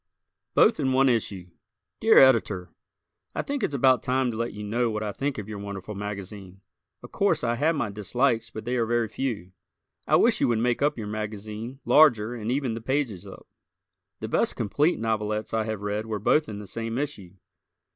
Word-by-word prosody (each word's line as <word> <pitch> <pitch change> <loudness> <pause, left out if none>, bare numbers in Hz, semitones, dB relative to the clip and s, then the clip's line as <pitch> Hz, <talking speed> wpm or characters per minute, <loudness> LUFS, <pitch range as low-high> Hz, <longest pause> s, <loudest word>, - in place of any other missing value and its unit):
Both 220 - +5
in 130 -3 +1
One 135 +1 +4
Issue 100 -7 -2 0.5
Dear - - +5
Editor: 105 -9 +4 0.6
I - - -1
think 280 -1 -3
it's 145 - -1
about 130 -3 +4
time 130 -1 0
to 110 - -6
let 115 +1 -2
you 105 0 -8
know 115 +3 0
what 110 -1 -3
I 105 - -2
think 140 +6 -3
of 105 -2 -6
your 105 -2 -6
wonderful 100 0 -6
magazine. 100 -2 -7 0.4
Of - - -11
course, - - +1
I 120 -1 +1
have 160 +5 +2
my 120 -8 -2
dislikes 115 +3 0
but 110 -1 -8
they 125 +1 -1
are 115 -2 +1
very 120 -1 +1
few. 110 -5 -4 0.6
I - - +4
wish - - +3
you - - +4
would 120 -2 +1
make 120 +1 0
up 145 0 +1
your 110 - -5
magazine 110 +4 -6
larger 120 -7 +5
and 115 -1 -4
even 130 -3 -1
the 115 - -5
pages 130 -6 -2
up. - - -12 0.8
The - - -3
best - - +1
complete 145 - +1
novelettes 110 -1 -2
I 110 -1 0
have 110 -2 -4
read 105 +2 -3
were 110 -1 -2
both 150 +7 +2
in 105 - -6
the 105 - -8
same 115 +3 -4
issue. 110 -11 -5
110 Hz, 200 wpm, -26 LUFS, 105-130 Hz, 0.8 s, Both